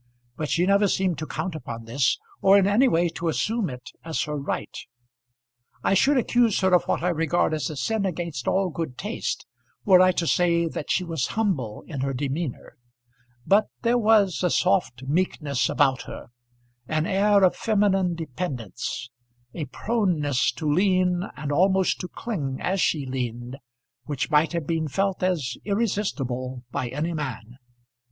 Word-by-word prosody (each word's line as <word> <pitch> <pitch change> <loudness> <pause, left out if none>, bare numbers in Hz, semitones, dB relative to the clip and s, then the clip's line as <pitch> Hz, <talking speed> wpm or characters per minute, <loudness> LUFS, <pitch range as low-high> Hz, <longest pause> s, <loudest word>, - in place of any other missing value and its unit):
But 155 -2 -4
she 175 +1 +2
never 200 +1 +4
seemed 185 -3 0
to 155 - -4
count 185 - -3
upon 115 -7 -7
this, 120 +4 +1 0.2
or 195 +1 +6
in 195 - +4
any 210 +7 +4
way 175 -6 +2
to 165 +1 -4
assume 210 +4 0
it 125 -1 -9
as 160 -1 -2
her 150 -1 -4
right. 140 -1 -4 1.1
I - - +2
should 270 +9 +4
accuse 240 -3 +2
her 190 -1 +3
of 180 - +4
what - - -1
I 180 - +2
regard 165 -1 +1
as 155 +1 -1
a 155 - -6
sin 205 - -1
against 170 -7 -4
all 190 -1 +1
good 155 -6 -5
taste 210 +4 -3 0.4
were 185 -3 +7
I 185 0 +6
to 175 - -1
say 170 0 +2
that 155 - -5
she 185 - +1
was 165 -7 -2
humble 165 - -1
in 150 -6 -6
her 135 0 -1
demeanour; 140 +1 -4 0.7
but 205 +2 +4 0.2
there 240 +1 +3
was 210 -5 +3
a 180 - +2
soft 175 -10 +1
meekness 140 -4 0
about 135 -3 +2
her, - - -9 0.6
an 155 0 0
air 200 +2 +3
of 185 - +4
feminine 195 -5 +1
dependence, 130 - -5 0.5
a 155 - -4
proneness 150 - 0
to 155 - -4
lean 180 +2 +2
and 150 -1 -4
almost 190 +4 +2
to 180 - -4
cling 150 - -4
as 190 +1 0
she 150 -4 +1
leaned, 125 -1 -4 0.5
which 145 +1 -3
might 150 +2 +3
have 170 -3 -2
been 160 0 -1
felt 195 +6 -1
as 160 -10 -1
irresistible 135 - -2
by 125 - -2
any 150 +7 -2
man. 125 -5 -6
170 Hz, 165 wpm, -25 LUFS, 140-190 Hz, 1.1 s, were